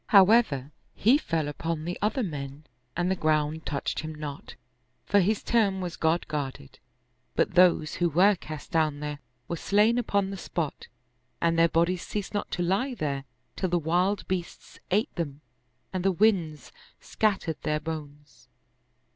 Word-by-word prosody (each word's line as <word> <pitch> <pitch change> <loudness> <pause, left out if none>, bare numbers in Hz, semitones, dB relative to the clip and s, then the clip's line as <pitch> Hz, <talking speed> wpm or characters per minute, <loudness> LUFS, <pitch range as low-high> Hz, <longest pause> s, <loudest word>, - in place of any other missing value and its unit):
However, 190 - +5 0.2
he 250 +8 +4
fell 165 - -1
upon 155 +2 -3
the 175 +1 -2
other 220 +5 +1
men 145 -4 -6 0.3
and 175 +1 +1
the - - +2
ground 155 -1 0
touched 140 - -2
him 155 0 -5
not, 150 -2 -7 0.5
for 205 - +4
his 205 +3 +1
term 205 -5 +2
was 180 -2 -4
God 160 +2 +1
guarded. 140 - -5 0.6
But - - +1
those 175 -3 +4
who 175 -1 +2
were 185 +6 +5
cast 155 -5 -8
down 155 -3 +1
there 150 -1 -4 0.3
were 170 - -3
slain 210 +7 +3
upon 200 -4 0
the 195 - -5
spot 165 -4 -4 0.5
and 165 0 +2
their 165 0 +4
bodies 170 +2 +1
ceased 205 -1 -4
not 205 - -2
to 175 - -2
lie 205 +9 0
there 140 -7 -2 0.3
till 185 - -1
the 175 - +2
wild 180 +5 +1
beasts 180 -2 -5
ate 215 +9 +1
them 145 -4 -4 0.5
and 185 -1 -2
the 195 - +3
winds 175 - +1 0.3
scattered 195 -7 -1
their 150 0 0
bones. 150 -4 -8
170 Hz, 160 wpm, -27 LUFS, 150-195 Hz, 0.6 s, However